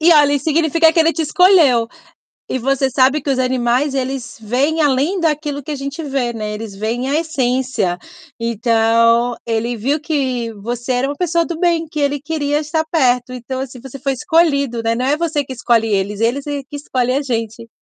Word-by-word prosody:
E 335 Hz, +2 st, +6 dB
olha 290 Hz, -2 st, +5 dB
isso 280 Hz, -1 st, -2 dB
significa 320 Hz, +1 st, +3 dB
que 330 Hz, -, +3 dB
ele 325 Hz, +1 st, +3 dB
te 330 Hz, -, -2 dB
escolheu. 305 Hz, -8 st, +4 dB, 0.6 s
E -, -, -1 dB
você 270 Hz, +1 st, 0 dB
sabe 265 Hz, +4 st, +3 dB
que 290 Hz, -, -7 dB
os 265 Hz, -, +1 dB
animais, 255 Hz, +2 st, +1 dB
eles 260 Hz, -3 st, -3 dB
veem 270 Hz, +9 st, 0 dB
além 295 Hz, +6 st, +1 dB
daquilo 300 Hz, -3 st, -1 dB
que 280 Hz, -, -8 dB
a 295 Hz, -, -2 dB
gente 280 Hz, +4 st, -5 dB
vê, 270 Hz, -4 st, -2 dB
né, 215 Hz, -2 st, -4 dB
eles 210 Hz, -2 st, -7 dB
veem 230 Hz, +5 st, -2 dB
a 305 Hz, -, +2 dB
essência. 255 Hz, -, -1 dB, 0.4 s
Então 230 Hz, +1 st, +2 dB
ele 230 Hz, +1 st, -1 dB
viu 275 Hz, +8 st, -1 dB
que 260 Hz, -7 st, -2 dB
você 240 Hz, +4 st, -4 dB
era 250 Hz, +2 st, 0 dB
uma 285 Hz, -, -3 dB
pessoa 340 Hz, -1 st, +1 dB
do 335 Hz, -1 st, -5 dB
bem 335 Hz, -2 st, +1 dB
que 305 Hz, -1 st, -5 dB
ele 285 Hz, 0 st, 0 dB
queria 295 Hz, -1 st, -1 dB
estar 315 Hz, +1 st, -1 dB
perto, 250 Hz, -5 st, +1 dB
então, 260 Hz, +1 st, -5 dB
assim, 255 Hz, -2 st, -7 dB
você 270 Hz, +1 st, -9 dB
foi 275 Hz, +1 st, -1 dB
escolhido, 280 Hz, -4 st, +1 dB
né. 230 Hz, 0 st, +1 dB
Não 250 Hz, -, -2 dB
é 290 Hz, +2 st, +2 dB
você 315 Hz, -3 st, -1 dB
que 260 Hz, -, -8 dB
escolhe 235 Hz, -2 st, +1 dB
eles, 200 Hz, 0 st, -1 dB
eles 245 Hz, +5 st, 0 dB
é 290 Hz, -1 st, -3 dB
que 290 Hz, -, -9 dB
escolhe 255 Hz, -3 st, -1 dB
a 275 Hz, +2 st, 0 dB
gente. 230 Hz, -3 st, -4 dB
265 Hz, 200 wpm, -18 LUFS, 235-300 Hz, 0.6 s, E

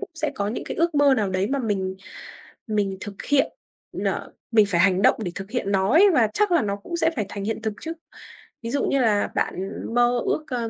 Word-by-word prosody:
cũng 405 Hz, -, -7 dB
sẽ 310 Hz, -1 st, -2 dB
có 200 Hz, 0 st, -2 dB
những 225 Hz, -, -4 dB
cái -, -, -5 dB
ước 335 Hz, 0 st, +1 dB
mơ 285 Hz, -2 st, +5 dB
nào 210 Hz, -5 st, 0 dB
đấy 185 Hz, +1 st, 0 dB
mà 280 Hz, -, 0 dB
mình 195 Hz, -6 st, -2 dB, 0.7 s
mình 205 Hz, -3 st, -1 dB
thực 200 Hz, -1 st, -7 dB
hiện 285 Hz, -2 st, +2 dB, 0.5 s
n -, -, -3 dB, 0.5 s
mình 215 Hz, -2 st, +5 dB
phải 170 Hz, -3 st, +1 dB
hành 190 Hz, 0 st, +4 dB
động -, -, +5 dB
để 175 Hz, -, -3 dB
thực 195 Hz, +2 st, -7 dB
hiện 225 Hz, -5 st, -2 dB
nó 195 Hz, +1 st, +2 dB
ấy 380 Hz, +8 st, +7 dB
và 235 Hz, -6 st, +4 dB
chắc 420 Hz, -3 st, +2 dB
là 340 Hz, -, +4 dB
nó 200 Hz, -2 st, -1 dB
cũng 205 Hz, +12 st, -7 dB
sẽ 325 Hz, -1 st, +3 dB
phải 215 Hz, -, -1 dB
thành 200 Hz, -1 st, -5 dB
hiện 225 Hz, +1 st, -3 dB
thực 220 Hz, -2 st, -2 dB
chứ. 325 Hz, +1 st, -4 dB, 0.7 s
Ví 230 Hz, -, -5 dB
dụ 280 Hz, -, 0 dB
như 275 Hz, -, +1 dB
là 210 Hz, -3 st, +2 dB
bạn 190 Hz, +1 st, -1 dB, 0.3 s
mơ 245 Hz, 0 st, +3 dB
ước, 305 Hz, -, -1 dB
ơ, 240 Hz, -3 st, -3 dB
220 Hz, 240 wpm, -24 LUFS, 200-280 Hz, 0.7 s, ấy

